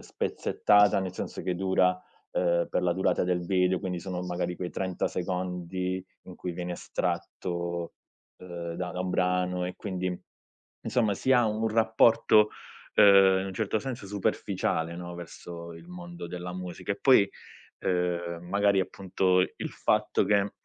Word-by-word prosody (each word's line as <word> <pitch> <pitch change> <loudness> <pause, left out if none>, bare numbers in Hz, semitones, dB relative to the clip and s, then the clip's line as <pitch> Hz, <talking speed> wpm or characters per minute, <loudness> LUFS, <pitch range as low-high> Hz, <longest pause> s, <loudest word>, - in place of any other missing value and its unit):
spezzettata, 105 -1 +2
nel 95 -2 -3
senso - - -5
che 90 0 -1
dura, 90 0 +2 0.4
ehm, 85 -1 +2
per - - 0
la 90 -1 +2
durata 95 +2 +1
del 90 -1 0
video. 90 0 +2
Quindi 90 -3 -4
sono 90 -2 -4
magari 90 0 -2
quei 90 - -4
30 95 -2 -2
secondi 90 0 -3 0.2
in 90 - -11
cui 90 - -5
viene 90 +1 -4
estratto, 85 0 -3 0.5
ehm, 85 -2 -6
da 90 +1 -3
da 90 - -4
un 90 0 -2
brano. 90 0 +1
E 90 0 -5
quindi 95 -2 -3 0.8
insomma 110 -5 +1
si 130 - 0
ha 120 -2 +5
un 110 +1 0
rapporto, 110 -1 +4 0.4
ehm, 95 -1 +7
in 95 - -3
un 95 - -6
certo 110 +2 -1
senso 120 -3 -5
superficiale, 85 -4 -1
no, 85 0 -7
verso 85 0 -9
il 85 +1 -13
mondo 85 -1 -8
della 90 0 -6
musica 90 +2 -5
e 100 - -4
poi, 130 -7 +6 0.5
ehm, 85 -1 -1
magari 100 0 +3
appunto 95 0 +1
i 90 - 0
il - - -4
fatto 105 0 +1
che, 100 0 +2
90 Hz, 155 wpm, -28 LUFS, 90-100 Hz, 0.8 s, ehm